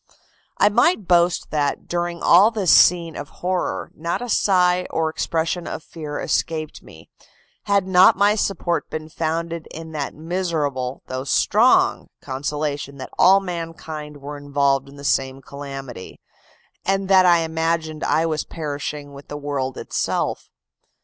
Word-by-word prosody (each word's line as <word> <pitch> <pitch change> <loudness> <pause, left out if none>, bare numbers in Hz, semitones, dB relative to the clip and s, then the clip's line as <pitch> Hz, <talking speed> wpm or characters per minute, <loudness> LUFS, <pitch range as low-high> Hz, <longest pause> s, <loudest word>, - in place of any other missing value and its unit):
"I - - +5
might 230 - +2
boast 175 -1 +2
that, 145 -2 -1
during 175 0 -3
all 190 +6 +7
this 210 -7 +1
scene 170 -2 +5
of 145 +1 -7 0.2
horror, 175 - -1
not 170 +2 -3
a 245 - -6
sigh 180 -3 +3
or 160 -1 -1
expression 165 +2 -2
of 155 - -5
fear 150 -3 -7
escaped 155 -2 -2
me, 80 0 -16 0.5
had 200 -2 +2
not 185 0 +6
my 205 +1 +4
support 190 -5 -1
been 155 0 -6
founded 165 +1 -3
in 160 0 -9
that 150 -3 -4
miserable, 155 -6 -2
though 130 0 -4
strong, 140 - +3
consolation 145 +1 -4
that 130 - -8
all 190 +2 +7
mankind 165 -4 -6
were 145 +1 -8
involved 140 -1 0
in 140 - -14
the 140 - -11
same 135 -1 0
calamity, 135 -6 -9 0.6
and 195 0 0
that 190 -1 +6
I 170 -1 +5
imagined 160 -1 -2
I 160 - +2
was 155 -2 -1
perishing 145 -2 -5
with 140 0 -12
the 145 - -6
world 140 -3 -3
itself! - - -2
160 Hz, 145 wpm, -22 LUFS, 145-175 Hz, 0.6 s, all